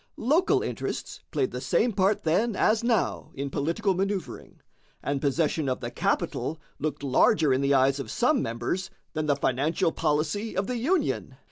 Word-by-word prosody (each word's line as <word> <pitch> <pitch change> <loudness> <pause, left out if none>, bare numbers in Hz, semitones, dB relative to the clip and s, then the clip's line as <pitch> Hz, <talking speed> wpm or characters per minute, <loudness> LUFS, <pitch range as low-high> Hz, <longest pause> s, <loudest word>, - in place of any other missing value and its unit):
Local 310 - +2
interests - - -4
played 390 - 0
the - - -5
same 235 - +1
part 195 +1 +2
then 200 +8 +1
as 220 +4 +2
now 235 -4 0
in 140 0 -4
political 170 +9 0
man[oe]uvring, 195 -1 -3 0.5
and 140 -1 -1
possession 150 0 +1
of 130 - -1
the - - -5
capital 160 - -1 0.2
looked 155 -1 -3
larger 140 +2 +4
in 130 - +1
the 140 0 +3
eyes 135 +1 +3
of 135 - -5
some 250 +2 +2
members 120 +11 -2 0.2
than 155 -1 -2
the 145 - +3
financial 150 +7 +1
policy 160 +9 -1
of 195 - +1
the 250 +2 -2
Union. 330 +11 0
165 Hz, 165 wpm, -27 LUFS, 140-215 Hz, 0.5 s, larger